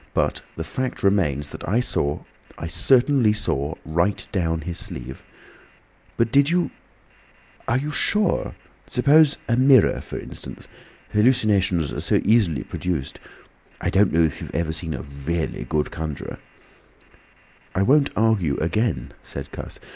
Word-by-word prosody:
But - - 0
the 80 - -4
fact 130 +10 -4
remains 75 -8 +1
that - - -7
I 110 +5 +3
saw—I 70 - -4
certainly 120 - +3
saw 75 -7 -1
right 85 +5 0
down 80 -4 0
his 85 +2 -4
sleeve—" 65 +2 -5 1.0
"But 115 -1 +1
did 140 +2 +4
you—are 170 -7 -5
you 145 +3 -3
sure? 205 +6 +1 0.3
Suppose 145 +4 +4
a 120 - +2
mirror, 130 -2 +5
for - - -7
instance— - - -8 0.5
hallucinations 105 - +2
are - - -3
so - - +2
easily 100 - +3
produced. 85 -7 -4 0.6
I - - -1
don't 100 0 +4
know 85 +1 +4
if 80 -3 -1
you - - -5
have - - -10
ever 80 -1 -1
seen 80 -1 -3
a 65 - -6
really 75 +4 -4
good 75 -1 -1
conjuror—" 80 -3 -5 1.4
"I 95 - +2
won't 140 +6 +4
argue 100 -10 +2
again," 85 - -1
said - - -8
Cuss. - - -8
95 Hz, 140 wpm, -23 LUFS, 80-120 Hz, 1.4 s, mirror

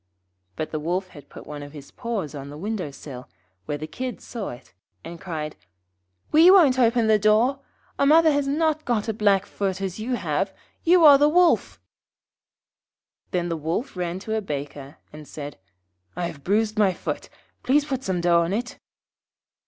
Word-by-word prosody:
But 155 - -4
the 155 - -2
Wolf 180 +4 -2
had 145 -5 -14
put - - -12
one 150 -1 -7
of 145 0 -10
his 145 -2 -11
paws 225 - -4
on 140 -1 -7
the 145 - -9
window 195 -2 -3
sill, 135 -2 -10 0.4
where 145 - -2
the 155 - -6
Kids 250 +10 -6
saw 230 -4 -5
it, 125 +1 -12 0.3
and 170 0 -9
cried 155 -4 -5 0.8
'We 325 +4 +7
won't 315 -10 +6
open 235 -1 +3
the 215 -1 +4
door. 220 +6 +3 0.4
Our 280 - +3
mother 320 +1 +6
has 285 -1 0
not 310 +1 0
got 235 -3 -1
a 220 - -1
black 200 -2 +2
foot 195 -2 -3
as 190 0 -4
you 245 +4 -2
have; - - -1 0.3
you 345 0 +5
are 285 -2 +9
the 295 +1 +5
Wolf.' 350 +2 +3 1.5
Then 175 -1 -1
the 165 - -1
Wolf 165 - -3
ran 175 -1 -3
to 220 - -4
a 220 - 0
Baker, 145 -4 -6 0.2
and 150 -1 -11
said, 145 -7 -8 0.6
'I 175 0 -2
have 140 -4 -7
bruised 215 +4 +1
my 195 -3 +4
foot; - - -5 0.3
please 285 +3 +2
put 265 -3 -3
some 185 -2 -1
dough 170 -1 +4
on 170 +3 -1
it.' 245 +4 -4
200 Hz, 185 wpm, -24 LUFS, 155-255 Hz, 1.5 s, are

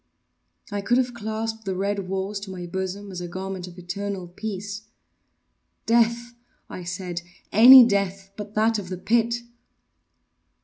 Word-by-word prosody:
I 205 0 -2
could 240 +5 +2
have 250 -1 0
clasped 220 0 -4
the 190 -1 -2
red 200 0 -2
walls 195 +2 -2
to 200 0 -9
my 180 -2 -6
bosom 190 +3 -4
as 180 -1 -6
a 175 - -5
garment 185 +1 -5
of 175 0 -12
eternal 190 +1 -5
peace. 200 +2 -6 1.0
“Death,” 235 +1 +2 0.3
I 180 - -8
said, 180 -1 -4 0.3
“any 250 +4 +10
death 195 -2 -1
but 210 0 -8
that 220 +1 +2
of 185 -3 -8
the 185 - -4
pit! 235 +4 +1
200 Hz, 145 wpm, -24 LUFS, 185-220 Hz, 1.0 s, any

